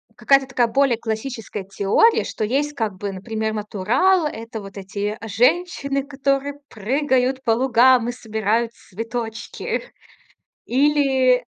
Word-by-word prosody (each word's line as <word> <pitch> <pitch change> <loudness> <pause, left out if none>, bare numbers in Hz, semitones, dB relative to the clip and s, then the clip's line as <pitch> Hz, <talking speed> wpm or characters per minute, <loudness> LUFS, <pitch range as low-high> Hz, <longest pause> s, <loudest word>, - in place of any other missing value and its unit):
какая-то 275 -1 +3
такая 245 -2 +1
более 270 0 +2
классическая 225 -2 -5
теория, 195 - +3
что - - -4
есть 285 +7 0
как 220 -7 -2
бы, 200 +1 -4
например, 220 +3 -3
натурал- 220 - +1
это 225 -4 -7
вот 195 0 -11
эти 200 +2 -4
женщины, 275 - +1
которые 275 0 -1
прыгают 260 +3 0
по 230 - +2
лугам 245 0 +4
и - - 0
собирают 225 -1 -1
цветочки. 225 +2 -5 0.8
Или 265 -2 +3
240 Hz, 120 wpm, -21 LUFS, 220-275 Hz, 0.8 s, лугам